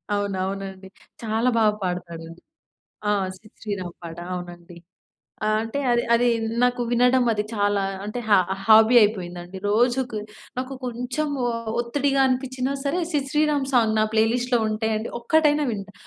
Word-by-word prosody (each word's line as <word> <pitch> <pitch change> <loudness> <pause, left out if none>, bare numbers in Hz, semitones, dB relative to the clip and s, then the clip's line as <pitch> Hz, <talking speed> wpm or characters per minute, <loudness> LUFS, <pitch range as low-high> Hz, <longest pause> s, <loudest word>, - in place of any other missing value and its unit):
అవును. 200 -2 -2
అవునండి. 195 0 -6 0.4
చాలా 225 +3 +1
బాగా 215 -2 +4
పాడతాడండి. 170 -2 -5 0.7
ఆ! - - +3 0.2
'సిద్ 215 +3 -20
శ్రీరామ్' 190 -5 -5
పాట 165 0 -8 0.2
అవునండి. 175 -1 -8 0.7
ఆహ్, 215 0 +2
అంటే 225 +5 -4
అది 240 0 +3
అది 245 +1 +3 0.4
నాకు 250 0 +2
వినడం 250 +1 +4
అది 210 -1 -1
చాలా 205 -1 +1 0.2
అంటే 215 +4 -4
హా 205 - +6 0.3
హాబీ 220 +3 +6
అయిపోయిందండి. 180 -3 -2
రోజుకి 240 +1 +1 0.4
నాకు 260 +1 -4
కొంచెం 250 +5 -3 0.2
ఒ - - +1 0.3
ఒత్తిడిగా 275 +3 0
అనిపిచ్చినా 260 +1 -1
సరే 290 +6 0
'సిద్ 285 -3 -1
శ్రీరామ్' 295 -2 +1
సాంగ్ 225 -4 +3
నా 215 - +4
ప్లే 220 0 +5
లిస్ట్‌లో 245 0 +1
ఉంటయండి. 220 +1 -1
ఒక్కటైనా 300 +3 +3
వింటా. 205 -1 -6
225 Hz, 140 wpm, -24 LUFS, 200-255 Hz, 0.7 s, హా